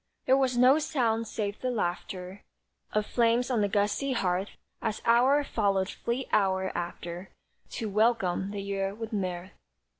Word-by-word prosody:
There 260 - +5
was 260 -2 +1
no 255 +5 +6
sound 230 -7 0
save 205 -1 -4
the 255 - -1
laughter 185 -2 -3 0.5
Of 215 0 0
flames 235 +2 +2
on 235 -4 +2
the 205 - +2
gusty 210 +7 0
hearth, 190 -3 0 0.3
As 215 - -2
hour 255 +5 +4
followed 200 -6 0
fleet 245 +3 -3
hour 190 -2 +1
after 175 +1 -5 0.4
To 225 - -3
welcome 205 -3 +1
the 200 -1 -5
Year 195 0 -2
with 225 +1 -6
mirth. 185 -2 -3
210 Hz, 150 wpm, -28 LUFS, 190-240 Hz, 0.5 s, no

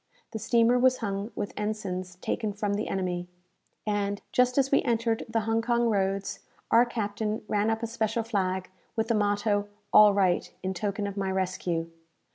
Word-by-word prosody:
The 220 - -4
steamer 235 +3 +3
was 255 0 +4
hung 200 -1 -3
with 205 - -4
ensigns 185 -4 -3
taken 215 -3 -2
from 205 0 -1
the 210 +2 -2
enemy; 180 -2 -2 0.6
and, 205 -1 -1
just 250 +1 +3
as 270 -1 +3
we 275 - +5
entered 230 -2 0
the 225 0 +1
Hong 225 +1 +1
Kong 235 0 +2
roads, 195 -1 -1 0.3
our 240 +1 +6
captain 215 -1 -2
ran 210 +1 +1
up 225 +1 -1
a - - +2
special 225 0 -1
flag, 190 -4 -1 0.2
with 225 0 -1
the - - +3
motto 205 -1 +1 0.3
"All 210 -1 +9
right," 190 -3 +1
in 190 0 -1
token 205 +2 -2
of 200 0 -5
my 195 -1 -1
rescue. 180 -3 -1
210 Hz, 175 wpm, -28 LUFS, 195-225 Hz, 0.6 s, All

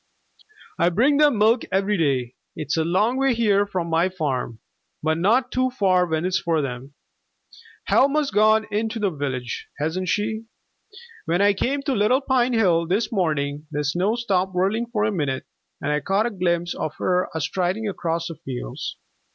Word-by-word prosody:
"I 170 - +4
bring 255 - +3
them 295 -5 +4
milk 220 +4 +4
every 195 +2 +1
day. 135 -8 0 0.2
It's 155 -2 -2
a 160 - +1
long 210 +9 +1
way 270 -2 +2
here 205 -3 +2
from 180 -4 -3
my 165 +2 +2
farm, 135 -10 -3 0.4
but 160 +1 +1
not 235 +8 +2
too 255 0 +1
far 185 -7 +2
when 160 +1 -1
it's 185 0 +1
for 165 -3 0
them. 135 0 -5 0.9
Helma's 280 +1 +2
gone 215 +1 +4
into 220 +2 -1
the 205 -3 0
village, 130 -5 -4
hasn't 160 +5 -2
she? 220 +3 -1 0.8
When 170 +2 +1
I 200 0 +4
came 275 +7 -1
to 280 -2 0
Little 240 +5 +2
Pine 255 -2 +1
Hill 175 -7 +2
this 200 +6 0
morning 150 -6 -1
the 150 -1 -2
snow 180 +9 0
stopped 190 -6 -1
whirling 205 +6 +1
for 225 -3 -1
a 215 - +1
minute, 145 -8 -2 0.3
and - - -2
I 150 - +1
caught 195 +6 +1
a 240 - -1
glimpse 175 -3 -1
of 155 - -4
her 180 0 0
a - - -1
striding 185 +7 -1
across 170 -4 -2
the 165 - -7
fields. 125 - -5
185 Hz, 175 wpm, -23 LUFS, 160-220 Hz, 0.9 s, I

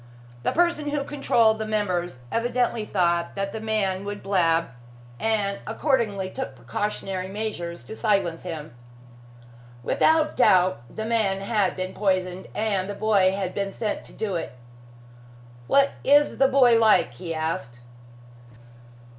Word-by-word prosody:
The - - 0
person 345 -4 +1
who 290 -1 -1
controlled 235 -6 +2
the 220 - -2
members 180 -8 -1
evidently 240 -1 0
thought 170 -4 0
that 195 0 -2
the 220 - -5
man 205 -4 -1
would 205 0 -6
blab, 170 -5 +2 0.5
and 205 -3 0
accordingly 220 -6 0
took 265 - -5
precautionary 185 - -3
measures 190 -4 -5
to 220 - -9
silence 195 -7 0
him. 160 -5 -7 1.1
Without 315 - +2
doubt, 185 - +4
the 220 - -5
man 215 -4 0
had 200 -2 0
been 185 0 -4
poisoned, 185 -2 -1
and 200 -3 -1
the 205 - -4
boy 200 -3 +3
had 190 -2 -3
been 200 -1 -2
sent 210 0 -3
to - - -14
do 210 -3 -3
it. 125 -8 -4 1.1
"What 275 0 +4
is 290 +2 +4
the 270 - +6
boy 255 -4 +5
like?" 215 - +4
he 165 +6 -6
asked. 155 -7 -3
200 Hz, 140 wpm, -25 LUFS, 185-225 Hz, 1.1 s, the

